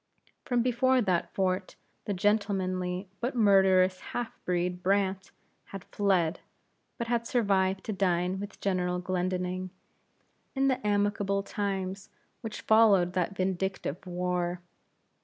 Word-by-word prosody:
From 245 -2 +1
before 255 +1 +3
that 185 -7 0
fort, 185 0 -1 0.3
the 205 - -1
gentlemanly, 190 -2 0
but 245 +2 -2
murderous 190 -4 +4
half 240 -2 -4
breed, 180 0 -1
Brandt, 190 0 0 0.4
had 195 -2 -9
fled, 185 -5 +1 0.6
but 235 - -2
had 235 0 -1
survived 195 -6 +1
to 215 - -3
dine 185 -1 0
with 205 0 -8
General 180 -2 0
Glendinning, 185 0 -2 0.9
in 270 0 +2
the 250 -5 -1
amicable 205 -1 +1
times 195 -1 -3 0.3
which 225 -2 -6
followed 205 -5 +4
that 185 +1 -1
vindictive 190 -3 -2
war. 180 0 -2
190 Hz, 120 wpm, -29 LUFS, 180-205 Hz, 0.9 s, murderous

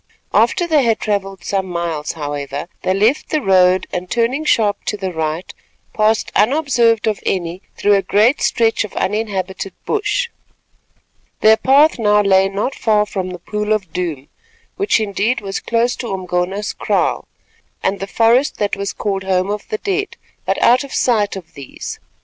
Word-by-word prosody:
After 350 - +3
they 315 -4 +3
had 225 -2 +2
travelled 195 -2 -2
some 195 -1 -1
miles, 170 -4 -3
however, 145 -1 -5
they - - 0
left 220 +9 +1
the 310 - +1
road 185 -5 +3
and 180 0 -4
turning 240 +7 0
sharp 210 -7 +2
to 210 - -2
the 190 -2 -4
right, 160 +2 -3 0.4
passed 215 +1 +1
unobserved 235 -2 +3
of 215 -2 0
any 175 -1 -2 0.2
through 205 - +3
a 200 - +4
great 210 +8 +2
stretch 225 -1 +2
of 215 - -8
uninhabited 195 -2 -2
bush. 440 +3 0 1.1
Their 220 0 +7
path 280 +5 +4
now 210 -1 +3
lay 195 -1 +4
not 200 +7 -2
far 210 -2 +2
from 190 -3 -4
the 180 - -6
Pool 210 +4 -2
of 190 -6 -3
Doom, 160 -7 -3 0.5
which, 400 - +2
indeed, 215 +3 0
was 195 -1 -4
close 235 +1 0
to 240 - -5
Umgona's 185 +2 -2
kraal, - - 0 0.6
and 195 - 0
the 195 - -4
forest 235 +6 +2
that 205 -1 0
was 200 -1 -3
called 195 -2 -2
Home 190 +1 +1
of 210 -1 -5
the 215 - -1
Dead, 400 - -2 0.3
but - - 0
out 250 +2 +5
of 280 - -10
sight 215 -5 +1
of 185 -4 -10
these. 140 -2 -8
205 Hz, 165 wpm, -18 LUFS, 185-230 Hz, 1.1 s, Their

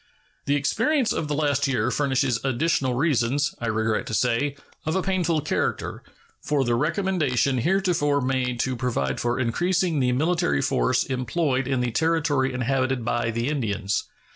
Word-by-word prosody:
The 140 - +2
experience 250 - +1
of 155 - -2
the 145 - -1
last 145 -2 +1
year 135 -2 0
furnishes 135 -4 0
additional 135 0 +1
reasons, 140 0 +1
I 120 - -2
regret 110 +2 0
to 110 - -2
say, 125 +4 +1 0.3
of 155 - -1
a 190 - +1
painful 175 -4 0
character, - - -2 0.4
for 145 -2 0
the 120 -2 0
recommendation 150 - +1
heretofore 170 -3 +1
made 130 -2 -1
to 130 -1 -1
provide 115 - -1
for 120 +1 -1
increasing 170 +6 +1
the 125 -1 +2
military 140 - +1
force - - +1
employed 130 +1 -1
in 130 -2 0
the 125 -1 -1
Territory 150 -2 +1
inhabited 130 0 -1
by 120 -1 0
the 115 +2 -2
Indians. 105 -8 -1
135 Hz, 155 wpm, -24 LUFS, 120-155 Hz, 0.4 s, The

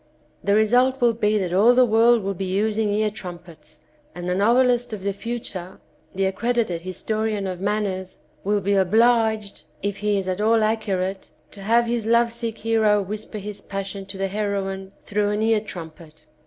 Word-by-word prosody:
The 200 0 +2
result 250 +5 +3
will 240 -1 +3
be 215 -1 +1
that 185 -4 -2
all 220 +6 +5
the 255 0 +6
world 230 0 +4
will 195 +1 -1
be 190 +1 -4
using 210 +3 0
ear 215 +1 +1
trumpets, 170 -6 -11 0.3
and 175 0 -6
the 180 - +1
novelist 240 +4 +2
of 200 -3 -6
the 200 0 -1
future, 200 -5 -6 0.4
the 195 0 +1
accredited 205 -2 -1
historian 215 +3 -2
of 185 -1 -4
manners, 195 -2 -2 0.3
will 205 +1 +1
be 200 +2 0
obliged, 220 +1 +2 0.2
if 205 0 -2
he 210 0 0
is 190 -1 -3
at 185 +2 -2
all 225 +2 +4
accu 215 -2 0
rate, 190 +1 -4 0.2
to 200 - -11
have 230 +4 +3
his 230 -2 -2
love 235 0 +3
sick 230 -1 -4
hero 220 -2 +2
whisper 210 +2 -5
his 205 0 -6
passion 195 0 -6
to 195 0 -8
the 195 0 -1
heroine 195 -2 -3
through 205 0 0
an 210 +1 0
ear 225 -1 +3
trumpet. 165 -6 -10
210 Hz, 180 wpm, -23 LUFS, 190-225 Hz, 0.4 s, the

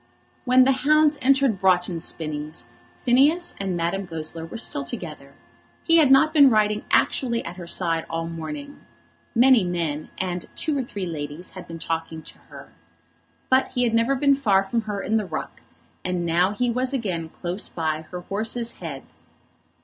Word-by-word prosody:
When 255 0 +6
the 265 - +4
hounds 300 +3 +3
entered 270 -5 +3
Broughton 180 -2 +2
Spinnies, 155 0 -4 0.4
Phineas 285 +8 +3
and 190 -3 -2
Madame 175 +4 -1
Goesler 165 0 -4
were 195 - -7
still 230 - -1
together. - - -8 0.5
He 330 0 +4
had 305 -4 +5
not 310 +4 +5
been 285 -4 +7
riding 210 -2 +1
actually 235 -3 +1
at 170 +2 -7
her 175 -2 -8
side 165 -2 0
all 165 0 -3
the 165 - -6
morning. 285 - -7 0.5
Many 245 -2 +6
men 165 -4 -2
and 180 -2 -3
two 310 -2 +1
or 275 - 0
three 205 -5 -5
ladies 155 +1 -6
had 185 - -10
been 165 - -7
talking 165 -1 -4
to - - -12
her. - - -12 0.8
But 260 0 +3
he 250 -1 -1
had 235 -2 +1
never 230 +4 +2
been 280 +1 +3
far 205 -8 +2
from 230 +4 -1
her 200 -1 -2
in 220 +2 +1
the 215 - -1
ruck, 155 -2 -6 0.4
and 180 -1 -2
now 170 +3 +2
he 245 +3 0
was 255 +3 -1
again 180 -10 -2
close 180 +4 -4
by 155 -2 -2
her 180 -1 -6
horse's 225 +5 -2
head. 150 -6 -7
195 Hz, 175 wpm, -24 LUFS, 165-255 Hz, 0.8 s, been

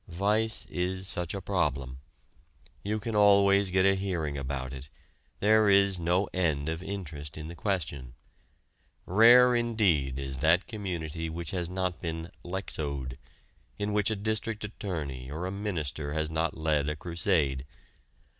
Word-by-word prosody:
Vice 105 +5 0
is 95 +1 -3
such 90 0 -3
a 100 - -4
problem. 70 -9 -1 0.8
You 105 +2 -1
can 110 +1 -4
always 100 -1 +5
get 95 +1 +3
a 95 - +5
hearing 90 -7 -2
about 65 -1 -4
it; 65 +1 -9 0.5
there 110 0 +5
is 100 -2 +4
no 90 +3 +1
end 80 -5 0
of 80 +1 -3
interest 80 -7 -6
in 80 +1 -6
the 85 - -8
question. 75 - -3 0.9
Rare 120 +5 +7
indeed 100 - +1
is 65 -1 -4
that 80 +6 +4
community 85 -7 -4
which 85 0 -5
has 90 -3 -2
not 90 -1 -2
been 80 0 -4
"Lexowed," 70 -8 -4 0.6
in 105 0 -2
which 105 0 +2
a 110 - 0
district 110 +1 -2
attorney 75 - -5
or 80 +5 -4
a 95 - -3
minister 80 -8 -3
has 80 0 -1
not 80 +1 -1
led 75 -2 +1
a 75 - -2
crusade. 80 -4 +1
90 Hz, 145 wpm, -29 LUFS, 75-100 Hz, 0.9 s, Rare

